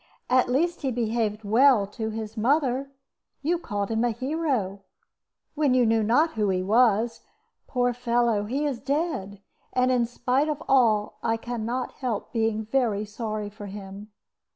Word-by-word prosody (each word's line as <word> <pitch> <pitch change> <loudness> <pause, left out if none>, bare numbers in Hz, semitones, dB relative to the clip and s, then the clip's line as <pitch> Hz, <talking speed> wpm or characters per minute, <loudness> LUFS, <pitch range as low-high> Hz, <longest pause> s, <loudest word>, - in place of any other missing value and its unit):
At 255 -1 +4
least 335 +7 +1
he 275 - 0
behaved 225 -2 -1
well 225 +1 +5
to 220 +2 -5
his 220 0 -6
mother. 265 +2 +1 0.5
You 340 +4 +1
called 205 - -3
him 225 +1 +1
a 245 - +2
hero 255 - -2 0.7
when 290 -4 +2
you 250 -1 +4
knew 225 0 +3
not 250 +10 +3
who 210 -2 0
he 185 -1 0
was. 225 +2 +3 0.5
Poor 245 -1 +1
fellow, 235 -3 +1
he 270 +7 -1
is 275 -5 -2
dead! 270 - -2 0.3
And, 255 0 +2
in 245 -2 +2
spite 255 +5 0
of 300 -1 -3
all, 225 -6 +3
I 225 0 0
can 230 -1 -4
not 250 +2 -2
help 240 -6 -4
being 220 -1 0
very 225 -3 0
sorry 215 -1 -4
for 205 -1 -9
him." 200 +1 -9
235 Hz, 160 wpm, -26 LUFS, 210-255 Hz, 0.7 s, well